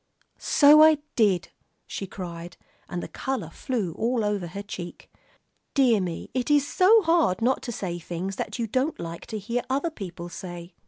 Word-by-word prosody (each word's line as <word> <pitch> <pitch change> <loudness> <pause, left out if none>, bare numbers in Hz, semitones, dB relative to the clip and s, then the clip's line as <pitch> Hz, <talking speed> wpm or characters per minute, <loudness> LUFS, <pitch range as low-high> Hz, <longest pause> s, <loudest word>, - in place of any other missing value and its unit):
"So 295 +1 +6
I 315 0 +7 0.2
did," 195 -6 +2 0.4
she 195 - -5
cried, 175 -2 -8 0.3
and 175 - -4
the - - -5
color 245 -11 -4
flew 210 -9 -3
over 210 -5 0
her 200 +5 -7
cheek. 180 -4 -8 0.6
"Dear 245 -7 +4
me, 175 -3 -5
it 255 +1 -1
is 290 -1 +4
so 420 +7 +5
hard 330 - +3
not 250 +3 +1
to 240 - -5
say 180 -6 -4
things 175 +3 -5
that - - -4
you 235 - -1
don't 260 +8 -1
like 170 0 -7
to 220 - -4
hear 235 +4 -2
other 280 +6 0
people 180 - -7
say." 175 0 -8
210 Hz, 170 wpm, -26 LUFS, 175-265 Hz, 0.6 s, I